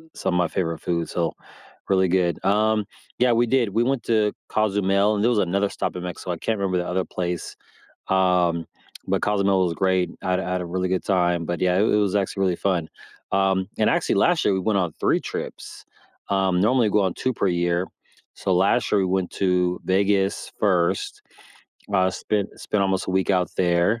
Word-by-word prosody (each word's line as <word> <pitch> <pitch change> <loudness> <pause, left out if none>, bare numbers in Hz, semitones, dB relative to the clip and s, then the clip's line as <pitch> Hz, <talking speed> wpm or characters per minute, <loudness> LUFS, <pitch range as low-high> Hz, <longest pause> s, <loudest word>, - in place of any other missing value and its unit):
some - - -2
of - - +2
my 90 -1 +2
favorite 85 -1 -2
foods, 85 -2 -2
so 85 -2 -1 0.6
really 95 -1 +3
good. 90 -2 0
Um, 105 +1 +2 0.3
yeah, 125 -1 +4
we 120 +1 +2
did. 120 -3 +2
We 115 +4 +1
went 130 -1 -1
to 110 -2 +1 0.2
Cozumel, 100 0 +1
and 105 - -1
there 120 - +4
was 115 -4 +2
another 100 +2 +1
stop - - -3
in 90 - -5
Mexico, 90 0 -5
I 85 - -3
can't 110 +4 -2
remember 95 -2 0
the 90 - -3
other 90 +1 -1
place. 90 -2 -4 0.5
Um, 90 -3 +2 0.4
but - - 0
Cozumel 100 -2 +2
was 85 - -1
great. 95 0 +1
I 95 - -1
had 90 - +1
I 90 - -4
had 90 - -1
a - - -4
really 90 +1 -2
good 95 -1 -1
time, 90 -3 +1
but 85 +2 -3
yeah, 90 -1 +2
it - - +4
it 105 - +3
was 105 -1 +1
actually 95 0 -1
really 90 -2 +2
fun. 90 -5 -1 0.4
Um, 95 -1 +1
and 110 - +3
actually, 170 -1 +1
last 175 -2 +3
year - - +3
we 95 - 0
went 100 -1 +1
on 90 -3 -1
3 - - +2
trips. - - -7 0.4
Um, 95 -2 +1
normally 115 0 +3
go 105 0 +2
on 95 -2 0
2 130 -1 -1
per 100 - 0
year. 85 0 0 0.5
So 95 - -1
last 100 +5 +2
year 105 - +3
we 95 - +1
went 95 -1 -1
to 90 -2 0
Vegas 95 +1 +1
first, 90 -5 0 0.7
uh, 95 0 +3
spent 105 +1 -3
spent 105 -2 -1
almost 95 -1 0
a - - -2
week 95 +1 +1
out 90 -2 +1
there. 90 +5 +2
95 Hz, 210 wpm, -23 LUFS, 90-105 Hz, 0.7 s, yeah